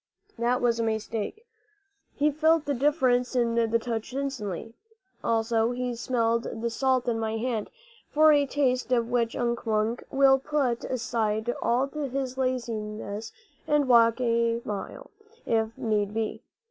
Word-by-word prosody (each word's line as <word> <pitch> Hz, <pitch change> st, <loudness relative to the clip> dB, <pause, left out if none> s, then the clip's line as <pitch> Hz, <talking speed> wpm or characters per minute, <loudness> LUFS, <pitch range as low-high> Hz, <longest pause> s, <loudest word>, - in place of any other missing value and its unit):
That 245 Hz, +2 st, +1 dB
was 235 Hz, -1 st, +2 dB
a -, -, +1 dB
mistake. 220 Hz, -, -3 dB, 0.7 s
He 300 Hz, +1 st, +2 dB
felt 315 Hz, +1 st, +3 dB
the 285 Hz, -, 0 dB
difference 255 Hz, -3 st, +2 dB
in 235 Hz, -2 st, +2 dB
the 230 Hz, -1 st, +2 dB
touch 230 Hz, 0 st, -4 dB
instantly. 230 Hz, -7 st, -4 dB, 0.5 s
Also 225 Hz, +1 st, +1 dB
he 250 Hz, 0 st, -2 dB
smelled 230 Hz, -1 st, 0 dB, 0.2 s
the 235 Hz, -, 0 dB
salt 260 Hz, +1 st, +1 dB
in 230 Hz, -2 st, 0 dB
my 220 Hz, 0 st, -2 dB
hand, 230 Hz, -2 st, -2 dB, 0.4 s
for 310 Hz, +1 st, +5 dB
a 285 Hz, -1 st, +3 dB
taste 255 Hz, -2 st, 0 dB
of 235 Hz, -1 st, +1 dB
which 235 Hz, -1 st, +1 dB
Unk 235 Hz, 0 st, -1 dB
Wunk 220 Hz, +2 st, 0 dB
will 270 Hz, 0 st, +5 dB
put 270 Hz, -4 st, -1 dB
aside 225 Hz, -2 st, -1 dB
all 245 Hz, +3 st, +2 dB
his 275 Hz, -3 st, -4 dB
laziness 225 Hz, -4 st, -3 dB, 0.4 s
and 295 Hz, -2 st, +2 dB
walk 230 Hz, -1 st, +5 dB
a 230 Hz, -1 st, +1 dB
mile, 210 Hz, -, -6 dB, 0.3 s
if 225 Hz, 0 st, 0 dB
need 210 Hz, -2 st, -1 dB
be. 225 Hz, -1 st, -2 dB
235 Hz, 145 wpm, -27 LUFS, 225-260 Hz, 0.7 s, for